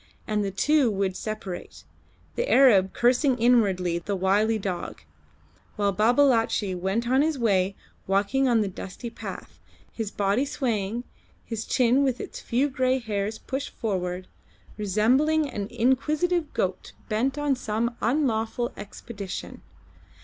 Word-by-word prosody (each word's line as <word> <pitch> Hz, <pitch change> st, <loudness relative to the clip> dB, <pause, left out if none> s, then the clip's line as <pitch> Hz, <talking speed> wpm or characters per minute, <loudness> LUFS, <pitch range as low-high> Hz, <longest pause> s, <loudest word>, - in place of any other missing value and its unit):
And 210 Hz, -1 st, 0 dB
the 200 Hz, -, -1 dB
two 275 Hz, +7 st, +2 dB
would 195 Hz, -2 st, -1 dB
separate, 215 Hz, -4 st, -6 dB, 0.5 s
the -, -, -2 dB
Arab 205 Hz, -9 st, +6 dB
cursing 250 Hz, +2 st, +2 dB
inwardly 195 Hz, -8 st, +2 dB
the 200 Hz, +4 st, -3 dB
wily 205 Hz, +4 st, +2 dB
dog, 190 Hz, -, -5 dB, 0.7 s
while 200 Hz, -1 st, +1 dB
Babalatchi 225 Hz, -2 st, +3 dB
went 190 Hz, +6 st, -1 dB
on 260 Hz, +3 st, +3 dB
his 310 Hz, -1 st, +1 dB
way 195 Hz, -5 st, +1 dB, 0.3 s
walking 200 Hz, +8 st, +2 dB
on 235 Hz, -3 st, +3 dB
the 205 Hz, -, 0 dB
dusty 195 Hz, +5 st, -7 dB
path, -, -, -8 dB, 0.3 s
his 225 Hz, -3 st, -3 dB
body 200 Hz, +5 st, +1 dB
swaying, 235 Hz, -5 st, -2 dB, 0.4 s
his 225 Hz, -1 st, -4 dB
chin 250 Hz, +1 st, +3 dB
with 260 Hz, -3 st, 0 dB
its -, -, -7 dB
few 255 Hz, +5 st, +1 dB
grey 260 Hz, -1 st, +1 dB
hairs 215 Hz, -3 st, -3 dB
pushed 270 Hz, +4 st, -4 dB
forward, 185 Hz, -4 st, -3 dB, 0.5 s
resembling 250 Hz, +10 st, +2 dB
an 205 Hz, -7 st, -4 dB
inquisitive 300 Hz, +8 st, +1 dB
goat 185 Hz, -1 st, -2 dB
bent 255 Hz, +6 st, 0 dB
on 290 Hz, -2 st, +1 dB
some 235 Hz, 0 st, -2 dB
unlawful 240 Hz, -2 st, 0 dB
expedition. 200 Hz, -1 st, -7 dB
225 Hz, 130 wpm, -26 LUFS, 200-260 Hz, 0.7 s, Arab